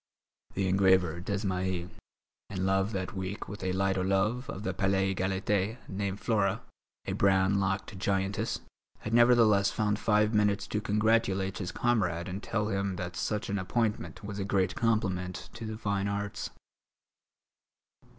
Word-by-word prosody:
The 95 -1 +1
engraver 95 -3 +3
Desmahis, 95 -2 -2 0.6
in 95 -1 -2
love 95 +2 +2
that 95 -3 -3
week 95 +1 -4
with 105 - -7
a 95 - 0
light 95 0 +1
o' - - +1
love 100 +7 +1
of 95 - -5
the 95 - -1
Palais 95 -1 +1
Égalité 95 +3 0
named 100 0 -3
Flora, 105 -2 +1 0.4
a - - -2
brown 95 0 +3
locked 95 0 -2
giantess, 95 0 -1 0.4
had 110 - -4
nevertheless 115 -4 +5
found 105 -1 0
five 105 0 +3
minutes 105 -2 +2
to 105 - -1
congratulate 105 -3 +1
his 90 -3 -3
comrade 90 -10 0
and 95 +2 -5
tell 105 -2 -1
him 100 -1 -1
that 90 0 -5
such 105 +2 -2
an 100 0 -1
appointment 105 +2 -1
was 100 0 -5
a - - -1
great 95 -1 +1
compliment 95 -7 -1
to 115 0 -6
the 110 0 -5
fine 100 -2 -1
arts. 100 0 -3
100 Hz, 150 wpm, -30 LUFS, 95-105 Hz, 0.6 s, nevertheless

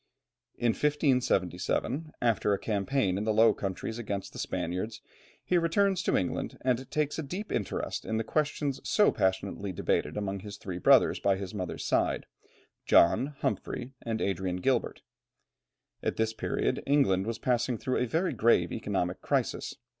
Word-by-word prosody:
In 120 - +1
1577, 145 +1 0
after 110 -3 +2
a - - +1
campaign 100 -1 0
in - - -2
the 110 - +1
Low 110 +2 +5
Countries 100 +4 -4
against 100 -4 -4
the - - -8
Spaniards, 100 +6 -3 0.5
he 180 - +3
returns 190 +3 +2
to - - +1
England 90 - -2
and 130 0 0
takes 150 0 -1
a - - 0
deep 185 +8 -5
interest 105 - -2
in 110 - -2
the 110 - 0
questions 145 0 -1
so 210 - +4
passionately 95 0 -1
debated 90 - -1
among 100 -1 -2
his 100 +1 -8
three 95 -3 -6
brothers - - +5
by 100 -1 +2
the 95 +1 -6
mother's 90 -3 -4
side, - - +1 0.6
John, 135 +12 +4
Humphrey, 130 +1 -3
and 115 -1 -3
Adrian 95 -1 -1
Gilbert. 125 +5 0 1.0
At - - -1
this 110 0 +1
period - - -1
England 120 -9 +3
was 115 -1 -2
passing 120 0 0
through 130 +3 -1
a 125 - +1
very 165 +9 0
grave 115 +1 +3
economic - - -2
crisis. - - -1
115 Hz, 155 wpm, -29 LUFS, 100-140 Hz, 1.0 s, Low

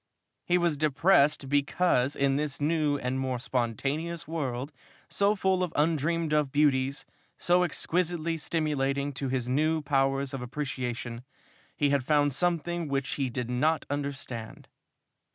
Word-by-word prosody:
He 180 - +4
was 170 -4 +1
depressed 150 -1 +3
because 140 -1 +2
in 140 -1 +2
this 145 -1 -2
new 150 -1 +1
and 130 0 -2
more 130 -1 -1
spontaneous 135 +7 -2
world, 140 -4 -3 0.4
so 200 +1 +2
full 190 -1 +1
of 180 -3 -1
undreamed 160 +1 +1
of 150 -3 +2
beauties, 140 -2 +2 0.3
so 175 +1 +3
exquisitely 170 -1 0
stimulating 145 -3 -1
to 135 0 -3
his 125 -2 -1
new 155 +4 +1
powers 135 -1 +1
of 135 - -4
appreciation, 125 -3 -4 0.5
he 145 -1 +2
had 140 -2 +2
found 145 0 +2
something 175 +1 0
which 135 -1 -1
he 130 - +1
did 125 0 -4
not 155 +6 +1
understand. 140 -5 -5
145 Hz, 135 wpm, -28 LUFS, 135-160 Hz, 0.5 s, He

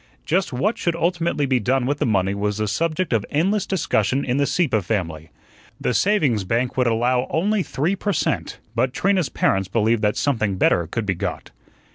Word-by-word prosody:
Just 180 +4 0
what 195 - -1
should 170 -1 0
ultimately 170 -3 0
be 130 -2 +2
done 125 +3 +1
with 145 +2 -1
the - - +1
money 100 -3 +1
was 105 0 -2
the 110 0 -1
subject 165 - -1
of 110 -3 +2
endless 195 +6 +1
discussion 135 - 0
in 125 +1 0
the 140 0 +2
Sieppe 145 - +1
family. 85 -6 -3 0.5
The - - 0
savings 140 - +2
bank 120 +6 -1
would 125 -2 +2
allow 125 +2 +1
only 200 +5 +1
three 170 +3 -1
per 205 +1 -2
cent., - - -1 0.2
but 125 +3 0
Trina's 190 -7 +1
parents 95 -1 +1
believed 110 +2 +1
that 105 -1 +1
something 110 -9 0
better 85 -2 +2
could 115 +6 -3
be 95 - 0
got. 85 - -5
125 Hz, 190 wpm, -22 LUFS, 105-165 Hz, 0.5 s, be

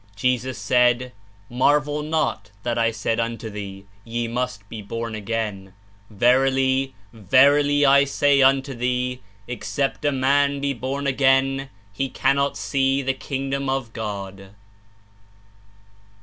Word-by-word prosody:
Jesus 125 +3 -1
said, 125 0 +2 0.4
''Mar 130 +4 +4
vel 150 0 -4
not 155 -4 -2
that 120 -1 -1
I 115 -1 +2
said 115 +1 -2
unto 115 -1 -3
thee, 100 -1 -8 0.2
Ye 115 0 -3
must 115 -4 -4
be 110 +1 -8
born 115 +2 -5
again.... 105 -3 -4 0.3
Verily, 130 +4 +2 0.2
verily 145 +7 +4
I 140 +1 +6
say 140 0 +2
unto 135 +1 +3
thee, 125 +1 -2 0.3
Except 135 +4 -3
a 145 - +2
man 140 +1 +2
be 140 0 -1
born 135 +3 -4
again, 135 0 +2 0.2
he 135 +6 -2
cannot 140 +2 0
see 135 0 0
the 135 0 0
kingdom 135 0 -3
of 135 -4 -2
God.'' 100 -3 -6
130 Hz, 125 wpm, -22 LUFS, 115-135 Hz, 0.4 s, I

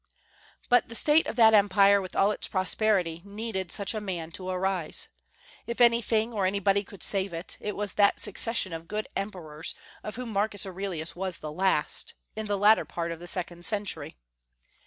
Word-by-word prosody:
But 245 -1 +4
the 230 - -7
state 300 +7 +4
of - - -4
that 225 -2 +6
Empire, 200 -1 +5
with 185 - -8
all 200 +2 +4
its - - -4
prosperity, 185 -3 +1
needed 200 -2 -4
such 200 +1 0
a 215 - -3
man 175 -5 -4
to 185 +1 -6
arise. 185 -2 -1 0.6
If 235 +1 -4
anything 235 -1 +3
or 200 -3 +1
anybody 200 +1 +1
could 195 -2 -12
save 195 -2 0
it, 165 +2 -5
it 210 - -4
was 205 -1 -1
that 200 -1 +3
succession 205 -2 +1
of 165 0 -7
good 215 +3 -3
emperors 170 -6 -4 0.3
of 210 - -6
whom 250 0 -5
Marcus 205 0 -1
Aurelius 185 -4 -4
was 185 -1 -2
the 155 - -6
last, 185 -2 +1 0.2
in 220 0 -4
the 205 -1 0
latter 210 +3 +5
part 170 0 -4
of 165 - -6
the 175 - -9
second 175 -1 -2
century. 205 - -2
195 Hz, 180 wpm, -28 LUFS, 180-215 Hz, 0.6 s, that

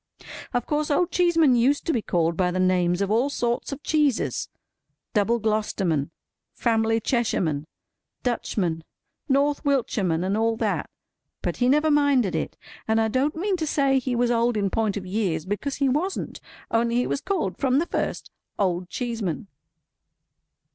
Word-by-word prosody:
Of 245 -1 -1
course 300 0 -1
Old 335 +4 +2
Cheeseman 330 -7 +4
used 260 +5 +2
to 330 - +1
be 235 - 0
called 170 -4 0
by 180 +1 +1
the 180 +1 -2
names 180 0 +2
of 200 - -2
all 240 +6 +2
sorts 240 -2 -1
of 275 +1 -6
cheeses—Double 235 -5 -1
Glo'sterman, 200 -9 0 0.5
Family 225 -1 +1
Cheshireman, 180 - 0 0.6
Dutchman, 180 -9 -1 0.5
North 280 +2 +2
Wiltshireman, 215 - +1
and 190 +2 0
all 225 +1 +1
that. - - -1 0.5
But - - -2
he 250 0 +2
never 300 +3 +3
minded 280 -9 +3
it. 160 - -3 0.3
And 220 0 +2
I 220 0 +2
don't 265 +6 0
mean 380 +3 0
to 315 -2 -2
say 275 -2 +2
he 255 -1 -2
was 240 0 +2
old 235 -1 +2
in 200 -2 0
point 215 -2 0
of 190 - -5
years—because 200 - -2
he 280 - +1
wasn't—only 255 -6 -2
he 245 - +2
was 280 - -2
called 320 - -2
from 265 -1 +2
the 325 - +2
first, - - -3 0.3
Old 180 -2 0
Cheeseman. 225 -7 -3
235 Hz, 155 wpm, -25 LUFS, 195-280 Hz, 0.6 s, Cheeseman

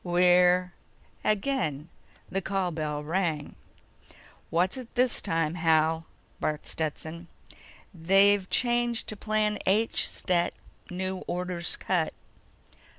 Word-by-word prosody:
We're—" 180 0 +4 0.5
Again 180 - 0 0.4
the 195 - -2
call 195 -1 -1
bell 150 -2 -3
rang. 160 -2 -1 1.0
"What 175 +3 +2
is - - -2
it 250 -1 -11
this 250 0 +2
time, 165 -1 0
Hal?" 160 -1 +2 0.3
barked 150 -1 -2
Stetson. 160 +2 -3 0.7
"They've 195 +3 +4
changed 240 -1 +1
to 215 - -4
Plan 210 0 0
H, 215 +4 +2
Stet. 175 -2 0 0.3
New 185 +1 -3
orders 180 -1 -2
cut." 175 -4 -1
180 Hz, 105 wpm, -28 LUFS, 165-200 Hz, 1.0 s, We're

